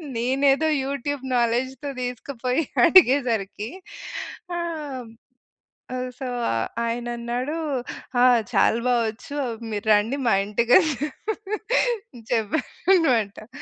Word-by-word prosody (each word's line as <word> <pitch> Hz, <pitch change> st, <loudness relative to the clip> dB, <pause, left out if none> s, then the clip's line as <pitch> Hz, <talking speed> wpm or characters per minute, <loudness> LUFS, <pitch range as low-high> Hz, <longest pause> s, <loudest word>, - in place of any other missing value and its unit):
నేనేదో 270 Hz, +5 st, +2 dB, 0.2 s
యూట్యూబ్ 280 Hz, 0 st, -3 dB
నాలెడ్జ్‌తో 255 Hz, +4 st, 0 dB
తీసుకుపోయి 250 Hz, +3 st, -2 dB, 0.2 s
అడిగేసరికి 245 Hz, -, +4 dB, 0.9 s
ఆహ్, 300 Hz, -7 st, -4 dB, 1.1 s
సో, 260 Hz, -, -4 dB, 0.6 s
ఆయనన్నాడు 240 Hz, +4 st, -3 dB, 0.7 s
ఆ! -, -, +6 dB, 0.3 s
చాలా 230 Hz, -, +4 dB
బా 250 Hz, -, +4 dB
వచ్చు. 250 Hz, +6 st, -7 dB, 0.4 s
మీరు 210 Hz, +1 st, -3 dB
రండి 220 Hz, +7 st, +2 dB
మా 225 Hz, -, +4 dB
ఇంటికని 240 Hz, -, +4 dB, 1.4 s
చెప్పారనమాట. 235 Hz, -, +1 dB
250 Hz, 75 wpm, -24 LUFS, 230-285 Hz, 1.4 s, ఆ